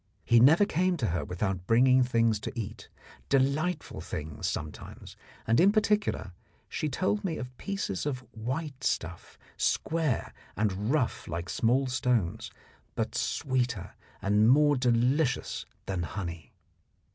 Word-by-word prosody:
He 120 0 +5
never 160 - +6
came 185 -1 +1
to 120 - 0
her 85 -2 -1
without 90 +2 -3
bringing 130 +3 +5
things 115 -3 +2
to 115 - -5
eat, 105 - -7 0.4
delightful 140 +6 0
things 75 -1 -4
sometimes; 75 0 -7 0.3
and 115 +1 +3
in 190 +4 +6
particular 210 - +1 0.4
she 155 - -2
told 190 +9 0
me 165 -5 -2
of 125 0 -7
pieces 195 - -3
of 130 -3 -2
white 135 +4 -4
stuff, 85 -6 -3 0.2
square 160 -7 0 0.2
and 105 0 0
rough 145 -6 0
like 85 +2 -4
small 125 +4 +2
stones, 115 -5 0 0.5
but - - -2
sweeter 125 -6 -1 0.3
and 105 +3 +4
more 145 +2 +5
delicious 125 +3 +1 0.2
than 95 -2 -2
honey. 85 -4 -5
125 Hz, 130 wpm, -29 LUFS, 100-145 Hz, 0.5 s, never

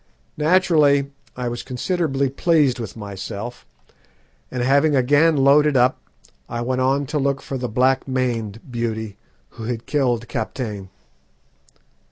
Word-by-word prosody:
Naturally 150 -4 +3 0.3
I 125 -1 -2
was 120 0 -4
considerably 140 +1 -1
pleased 140 -2 +2
with 115 -2 -6
myself, 100 +3 -7 0.8
and 125 -1 -3
having 140 +3 +3
again 145 +5 +4
loaded 140 +1 +4
up, 125 +1 +3 0.5
I 120 - -4
went 130 +1 -1
on 135 +2 +1
to 150 +2 -2
look 140 0 0
for 135 - -6
the 125 -1 -3
black 130 +4 +2
maned 115 -5 -2
beauty 110 -3 -3 0.3
who 115 - -9
had 115 -1 -4
killed 125 -5 0
Kaptein. 110 -5 -4
130 Hz, 130 wpm, -21 LUFS, 120-140 Hz, 0.8 s, again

